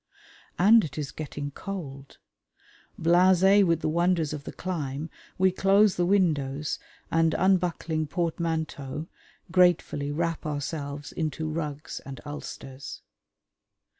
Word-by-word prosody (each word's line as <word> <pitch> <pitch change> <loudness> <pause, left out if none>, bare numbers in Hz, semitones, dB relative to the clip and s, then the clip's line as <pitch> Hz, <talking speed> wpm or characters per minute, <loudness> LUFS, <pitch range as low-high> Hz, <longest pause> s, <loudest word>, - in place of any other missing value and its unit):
And 215 +5 +6
it 145 -3 -6
is 150 -2 -3
getting 145 -2 -5
cold. 140 -7 -7 0.8
Blasé 185 +4 +5
with 165 -3 +2
the - - 0
wonders 170 -1 +1
of 145 -2 -6
the - - -5
climb, 155 -4 -4 0.3
we 190 0 +4
close 195 +1 +4
the 175 0 +1
windows 150 -7 +1 0.3
and, 165 -1 +3
unbuckling 175 -4 +1
portmanteaux, 160 -3 -2 0.4
gratefully 175 -5 +3
wrap 165 +1 -1
ourselves 145 -1 -4
into 160 0 -3
rugs 155 -1 -4
and 135 0 -9
ulsters. 140 -2 -8
160 Hz, 110 wpm, -27 LUFS, 145-180 Hz, 0.8 s, And